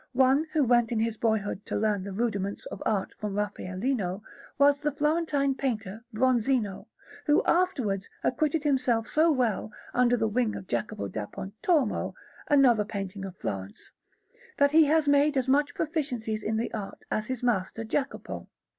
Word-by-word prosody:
One, 265 +4 +4
who 310 -3 +3
went 240 -2 +3
in 230 - 0
his 225 0 0
boyhood 215 -3 -1
to - - -3
learn 210 -2 +1
the 200 - -6
rudiments 200 -2 -2
of - - -7
art 205 -3 0
from 210 -2 -4
Raffaellino, 205 0 -2 0.3
was 285 0 +5
the 295 0 0
Florentine 295 -1 +1
painter 225 -5 -3
Bronzino, 240 -3 +1 0.4
who 295 - +4
afterwards 255 - +1
acquitted 305 +4 +1
himself 255 -6 +2
so 315 +6 +3
well 235 -6 0 0.2
under 245 0 +3
the 225 - +1
wing 220 0 0
of - - -7
Jacopo 115 - -3
da 105 +2 -5
Pontormo, 220 - -1 0.3
another 255 -7 +5
painter 195 -2 -5
of 185 -1 -11
Florence, 95 0 -6 0.7
that 285 0 +4
he 315 +1 +7
has 310 0 +2
made 285 0 +4
as 260 -1 +1
much 285 +2 +2
proficience 295 -8 -2
in 220 0 -1
the 230 - -2
art 210 -3 -6
as 215 0 -1
his 255 -2 -4
master 225 -2 0
Jacopo. 270 +5 -3
240 Hz, 160 wpm, -28 LUFS, 205-280 Hz, 0.7 s, he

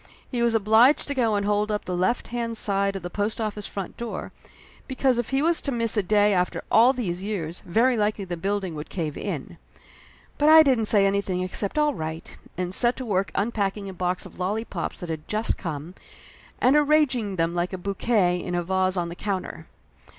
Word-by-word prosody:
He 245 -3 -1
was 235 -1 +2
obliged 225 +6 +4
to - - 0
go 235 -5 +1
and 200 0 0
hold 210 +1 +1
up 210 - -2
the 180 - -3
left 185 +7 0
hand 230 -1 -3
side 200 -1 +1
of 195 - -5
the 175 - -4
post 210 +2 -2
office 210 -2 -3
front 195 -3 -6
door, 235 -1 -5 0.6
because 260 -2 +1
if 240 - -2
he 270 +2 +1
was 335 +1 +2
to 280 - -2
miss 230 -2 +1
a 210 - +3
day 205 +2 +3
after 180 -1 0
all 235 +3 +6
these 190 -9 -3
years 180 -5 -4
very 235 +8 +3
likely 210 -2 0
the 175 -1 -4
building 195 0 -2
would 150 0 -7
cave 155 -5 -3
in. - - -5 0.8
But 295 +1 +4
I 315 0 +9
didn't 255 -6 +2
say 205 -2 +5
anything 195 -2 0
except 195 +6 -2
all 300 -1 +3
right, 160 -1 -6 0.2
and 180 0 -3
set 240 +4 +3
to 260 - -5
work 195 -5 0
unpacking 200 -2 -1
a - - -7
box 180 0 -2
of - - -13
lollypops 195 -1 -3
that 175 - -6
had 160 -1 -5
just 215 +1 -1
come, 160 +1 -5 0.6
and 255 +3 +3
arranging 290 -9 +2
them 165 -1 0
like 175 +1 -1
a 190 - -4
bouquet 190 -1 0
in 175 0 -4
a 175 - 0
vase 185 +1 0
on 170 -1 -1
the 170 - -7
counter. 195 -1 -4
205 Hz, 210 wpm, -25 LUFS, 180-235 Hz, 0.8 s, I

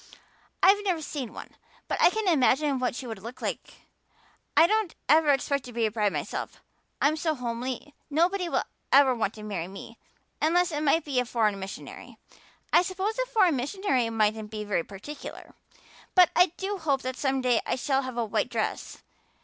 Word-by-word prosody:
I've 405 +2 +6
never 355 -5 -1
seen 280 -5 -5
one, - - -11 0.3
but - - -2
I - - +8
can 435 +1 -2
imagine 285 -3 +3
what 250 -1 -1
she 255 - -6
would 225 -5 -7
look 230 +5 -9
like. - - -5 0.8
I - - +8
don't 425 -2 0
ever 305 +1 +5
expect 280 0 +1
to 245 - -10
be 230 -1 +1
a 215 - 0
bride 210 -2 +1
myself. - - -4 0.4
I'm 295 +2 +3
so 315 0 -1
homely 250 +3 -4 0.2
nobody 350 +4 +1
will - - +1 0.3
ever 270 -2 +6
want 225 -3 -2
to 215 - -10
marry 195 -5 -4
me 195 +4 -11 0.4
unless 350 +3 +3
it 295 -1 -2
might 310 +2 +2
be 275 -4 0
a - - +2
foreign 215 -4 0
missionary. 190 0 -9 0.6
I - - +7
suppose 385 +5 -3
a - - 0
foreign 400 - +3
missionary 265 - 0
mightn't 215 -1 0
be 215 0 -5
very 205 -5 -1
particular. 210 - -9 0.6
But 360 -2 +7
I 360 - +6
do 390 +1 -3
hope 280 -5 0
that 255 0 -3
some 270 -1 0
day 250 -2 +2
I - - +1
shall 270 +1 0
have 255 -2 -6
a 235 - +1
white 210 - -1
dress. - - -3
270 Hz, 190 wpm, -27 LUFS, 230-335 Hz, 0.8 s, I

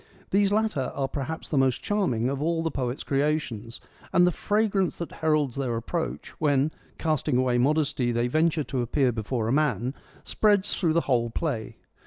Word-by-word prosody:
These 200 0 +3
latter 210 -11 0
are 135 -1 0
perhaps 145 +4 -5
the 145 - +1
most 130 -2 +1
charming 135 - 0
of 135 +1 -2
all 165 +1 0
the 165 - -1
poet's 125 -2 -3
creations, 135 -5 -1 0.3
and 180 - +5
the 180 - +3
fragrance 205 -1 0
that 170 - -5
heralds 155 -5 0
their 130 -4 -1
approach, 160 +8 -3
when, 145 0 +2 0.3
casting 155 -4 0
away 125 -1 +2
modesty, 140 -2 +1
they 120 0 +1
venture 155 +3 +2
to 130 -2 -2
appear 125 +2 +1
before 110 0 -2
a 115 - +1
man, 135 -4 +1 0.3
spreads 205 -2 +2
through 165 -4 +2
the 170 - +3
whole 120 -5 +1
play. 120 -4 -3
145 Hz, 175 wpm, -26 LUFS, 125-165 Hz, 0.3 s, and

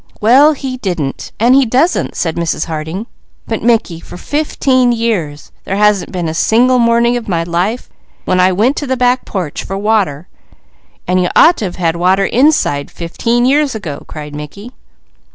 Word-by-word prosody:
"Well, 270 +8 +5
he 265 -2 -5
didn't; 175 - -4
and 240 +3 +4
he 275 +1 +5
doesn't!" 265 +9 0
said 165 -2 -2
Mrs. 170 -2 -2
Harding. 160 +6 -5 0.4
"But 225 - -3
Mickey, 220 -7 +1
for 170 - -11
fifteen 260 - 0
years, 210 -11 -2
there 195 - -3
hasn't 210 -2 +2
been 180 -3 -3
a 160 - -3
single 245 +8 +2
morning 235 +1 +2
when 180 +1 -3
I 185 +1 +4
went 220 +9 +1
to 290 - -3
the 260 0 -1
back 250 +1 +1
porch 180 -7 -4
for 195 - -5
water 195 -7 0 0.4
" - - -38
"And 185 0 +2
you 180 - 0
ought 345 - +6
to 215 - -3
have 180 - -5
had 170 -2 -1
water 185 +3 +2
inside, 245 - +1
fifteen 230 +8 -1
years 280 0 +2
ago!" 165 -10 -6
cried 150 -1 -8
Mickey. 150 +11 -9
210 Hz, 170 wpm, -14 LUFS, 170-245 Hz, 0.4 s, ought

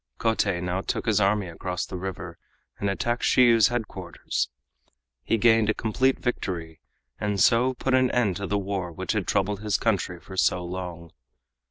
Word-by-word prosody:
Kotei 105 -5 +1
now 90 +1 -1
took - - -3
his 110 -3 +2
army 100 0 +2
across 90 0 -4
the - - -8
river, 95 -1 -6 0.4
and 100 - 0
attacked 120 +5 -1
Shiyu's 115 -3 +5
headquarters. 105 -8 -3 0.7
He 115 - +1
gained 115 -1 +4
a 110 - +2
complete 130 +4 +1
victory, 85 -9 -4 0.4
and 105 -1 -1
so 125 +6 +4
put 130 +1 -1
an 130 -1 +4
end 105 -8 +1
to 100 - -4
the 105 - 0
war 95 -3 -3
which 80 - -3
had - - -1
troubled 100 +1 0
his 105 -2 +1
country 95 -5 -1
for 95 - -11
so 90 -1 +1
long. 85 -2 -6
100 Hz, 170 wpm, -26 LUFS, 90-115 Hz, 0.7 s, Shiyu's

